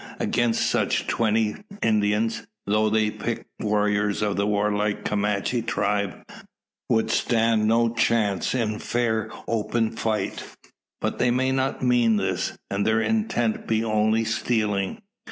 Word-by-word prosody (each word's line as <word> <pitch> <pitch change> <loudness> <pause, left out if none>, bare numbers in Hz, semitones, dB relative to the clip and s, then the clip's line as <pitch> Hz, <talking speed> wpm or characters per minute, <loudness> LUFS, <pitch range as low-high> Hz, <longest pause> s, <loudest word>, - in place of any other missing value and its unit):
Against 120 -1 +1
such, - - +1
twenty 110 -1 +1 0.3
Indians 110 +1 +1 0.2
though 105 +1 +2
the 110 0 +2
picked - - -4
warriors 105 -1 +1
of 105 -2 0
the 100 +1 0
warlike 105 0 0
Comanche 105 +3 0
tribe 100 -3 -1 0.7
would 110 -1 +2
stand 115 -2 +2
no 115 +1 +3
chance 110 -3 +1
in 110 -3 -1
fair 110 -2 -1 0.2
open 115 0 0
fight. 110 -1 -2 0.6
But - - -2
they 125 - +3
may 130 +2 +1
not 130 0 -1
mean 120 -3 +3
this; 100 -2 -1
and 100 +1 0
their 110 +1 +2
intent 120 - 0
be 110 0 +1
only 110 0 +2
stealing? 110 - -1
110 Hz, 130 wpm, -24 LUFS, 105-115 Hz, 0.7 s, no